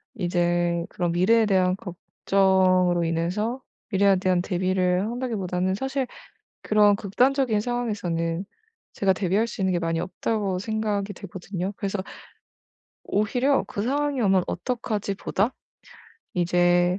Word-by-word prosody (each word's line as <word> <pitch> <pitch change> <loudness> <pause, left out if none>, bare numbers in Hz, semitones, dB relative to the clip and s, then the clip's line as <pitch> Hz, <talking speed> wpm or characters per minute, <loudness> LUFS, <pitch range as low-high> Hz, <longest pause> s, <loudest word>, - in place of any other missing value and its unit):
이제 175 -1 0
그런 175 -1 -2
'미래에 215 +7 +4
대한 185 -3 +2
걱정으로 185 -2 +1
인해서 185 +10 -1 0.3
미래에 195 -1 +4
대한 185 -1 +1
대비를 185 0 +1
한다.'기보다는 190 -7 -2
사실 265 +3 -2 0.6
그런 210 -1 +4
극단적인 245 +2 +1
상황에서는 200 -8 -2 0.5
제가 195 -1 +2
'대비할 195 +4 +1
수 210 - -8
있는 190 -1 +1
게 175 - +1
많이 165 -1 -1
없다.'고 195 +1 -2
생각이 210 -1 -2
되거든요. 185 0 -5
그래서 200 0 -3 1.1
오히려 245 +7 +1
'그 200 - -4
상황이 285 +3 0
오면 190 -4 +3
어떡하지?' 220 -5 -2
보다 205 +4 -1 0.8
이제 175 +1 +3
195 Hz, 295 characters per minute, -25 LUFS, 180-215 Hz, 1.1 s, 미래에